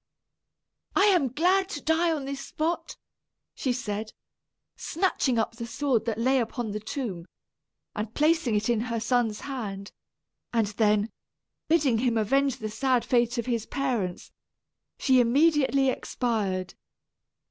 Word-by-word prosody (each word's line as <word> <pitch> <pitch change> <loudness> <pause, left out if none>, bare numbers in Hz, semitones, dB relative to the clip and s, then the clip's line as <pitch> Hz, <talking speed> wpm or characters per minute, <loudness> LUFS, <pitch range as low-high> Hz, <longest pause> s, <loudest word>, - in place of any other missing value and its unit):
"I 395 - +5
am 360 -9 +4
glad 370 +7 +2
to 295 - -4
die 330 +2 +2
on 295 -4 -2
this 275 0 -5
spot," 325 +3 -3 0.6
she 260 - -1
said, 220 -3 -4 0.6
snatching 310 -8 0
up 225 - +1
the 235 -1 -5
sword 255 -3 0
that 225 -3 -1
lay 260 +3 +2
upon 235 -1 -3
the 210 - -3
tomb 210 -6 -5 0.7
and 210 +1 -3
placing 305 -4 +2
it 210 +1 0
in 235 -2 +2
her 230 0 -1
son's 230 -2 0
hand; 205 -8 -5 0.6
then, 210 -1 +2 0.6
bidding 290 -8 +3
him 240 -1 +1
avenge 270 +4 +2
the 215 -3 -5
sad 255 0 +1
fate 240 -1 +2
of 235 - -1
his 235 -3 -2
parents, 240 -10 -2 0.7
she 260 -2 +4
immediately 275 +1 +3
expired. 205 -8 -2
245 Hz, 135 wpm, -27 LUFS, 220-280 Hz, 0.7 s, I